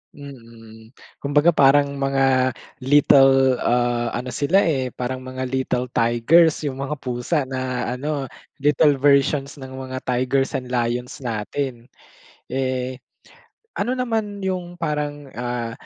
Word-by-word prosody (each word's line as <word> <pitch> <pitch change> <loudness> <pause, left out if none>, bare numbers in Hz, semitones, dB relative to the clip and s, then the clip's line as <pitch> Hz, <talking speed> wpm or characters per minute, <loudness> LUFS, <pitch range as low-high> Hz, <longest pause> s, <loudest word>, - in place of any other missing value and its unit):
Mm. 115 -4 -13 0.2
Kumbaga 145 +4 +3
parang 140 -1 +4
mga 135 -2 +2 0.2
little 135 -1 +5
ah, 120 -1 +1
ano 125 +1 -4
sila 165 +10 +2
eh, 135 -6 0
parang 125 +1 -4
mga 130 0 -6
little 125 -1 -2
tigers 145 +9 +3
yung 135 -2 -4
mga 140 +2 -3
pusa 125 +5 -1
na 130 -1 -3
ano, 140 +2 -3 0.4
little 145 0 +4
versions 140 +1 +2
ng 130 0 -9
mga 130 0 -6
tigers 130 +2 0
and 125 -1 -4
lions 125 +2 -2
natin. 120 +1 -4 0.5
Eh, 130 -1 -3 0.8
ano 240 +5 0
naman 220 -5 -2
yung 180 -2 -3
parang 150 -4 -4
ah, 120 -1 -4
130 Hz, 120 wpm, -22 LUFS, 125-145 Hz, 0.8 s, little